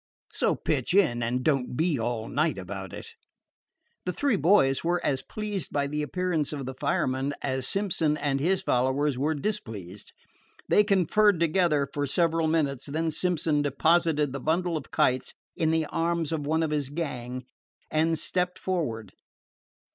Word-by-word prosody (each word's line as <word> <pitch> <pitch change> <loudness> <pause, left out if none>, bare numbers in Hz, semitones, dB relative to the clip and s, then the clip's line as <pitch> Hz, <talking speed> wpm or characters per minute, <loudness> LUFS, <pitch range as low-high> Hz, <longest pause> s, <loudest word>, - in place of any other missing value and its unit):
So - - +1
pitch 145 +3 -1
in, 140 -12 +3
and 120 +2 -1
don't 135 -4 0
be 160 -5 +1
all 115 -1 -2
night 155 -1 0
about 95 0 -6
it." - - -8 0.9
The - - +2
three 275 +5 +1
boys 145 -6 +3
were 175 +1 +1
as 135 -2 +1
pleased 210 +2 -4
by 140 -1 0
the 150 +2 -2
appearance 165 0 -1
of 140 -3 -4
the 130 - -5
fireman 130 +2 -1
as 130 -1 -1
Simpson 165 -6 0
and 140 -2 0
his 185 +6 +1
followers 130 0 +1
were 155 +3 +1
displeased. 110 - -5 0.6
They 210 - +5
conferred 200 0 +3
together 165 -4 +2
for 145 -1 -1
several 165 +2 +2
minutes, 145 -4 0
when 160 +2 -1
Simpson 160 -3 +1
deposited 150 0 +2
the 140 - -3
bundle 170 +4 0
of 150 - -5
kites 130 0 +1 0.2
in 160 - +1
the 160 0 +1
arms 165 0 -1
of 150 -3 -2
one 160 +2 +1
of 155 - -1
his 145 -3 -1
gang 130 -5 -4 0.5
and 160 +1 +2
stepped 180 +2 -1
forward. 120 - -3
150 Hz, 160 wpm, -27 LUFS, 130-170 Hz, 0.9 s, They